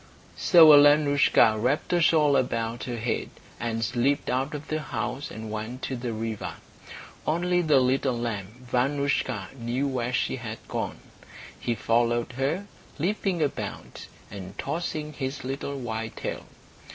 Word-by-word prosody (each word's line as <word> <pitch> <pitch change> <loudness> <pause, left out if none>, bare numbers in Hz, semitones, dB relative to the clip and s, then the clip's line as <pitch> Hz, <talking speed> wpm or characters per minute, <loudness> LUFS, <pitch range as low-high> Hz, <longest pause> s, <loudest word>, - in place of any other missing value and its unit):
So 160 -3 +8
Alenoushka 145 -6 +5
wrapped 140 +9 0
a 175 - +3
shawl 150 -3 +4
about 115 -2 -1
her 120 -2 -4
head, 115 +1 -2 0.3
and 115 -1 -1
slipped 125 +6 0
out 135 +4 -1
of 150 +1 -7
the 155 0 -2
house 135 -1 -4
and 110 0 -7
went 110 +4 -5
to 130 - -2
the 120 -1 -4
river. 110 -1 -4 0.7
Only 175 +3 +2
the 155 -5 +4
little 130 0 +1
lamb, 115 +1 -5
Vanoushka, 130 -3 0
knew 120 +4 -1
where 125 -2 -2
she 130 - 0
had 115 -3 -6
gone. - - -4 0.6
He 120 +6 -1
followed 115 +3 +1
her, 140 +10 -1 0.3
leaping 180 0 0
about, 145 - -5 0.2
and 95 -1 -8
tossing 155 -2 -3
his 135 0 -4
little 140 +2 -4
white 115 -3 -4
tail. - - -5
130 Hz, 140 wpm, -26 LUFS, 115-145 Hz, 0.7 s, So